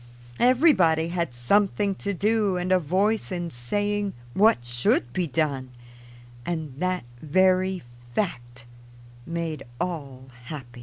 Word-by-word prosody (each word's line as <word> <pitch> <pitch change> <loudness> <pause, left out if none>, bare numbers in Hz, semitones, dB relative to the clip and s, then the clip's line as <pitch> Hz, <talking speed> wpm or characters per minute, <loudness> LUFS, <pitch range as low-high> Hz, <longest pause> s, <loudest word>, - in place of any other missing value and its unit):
Everybody 195 - +4
had 170 -5 -1
something 200 - +2
to 200 +1 -4
do 205 0 +1
and 180 +1 -2
a 185 - +5
voice 195 +7 0
in 175 -2 -3
saying 205 +11 -1 0.2
what 200 - +4
should 120 0 +1
be 180 +2 0
done, 140 -2 -1 0.7
and 160 -2 -3
that 185 0 0 0.2
very 185 +3 +2 0.3
fact 120 - -3 0.6
made 165 -3 -3 0.2
all 135 -7 -5
happy. 125 -4 -8
175 Hz, 115 wpm, -25 LUFS, 135-195 Hz, 0.7 s, a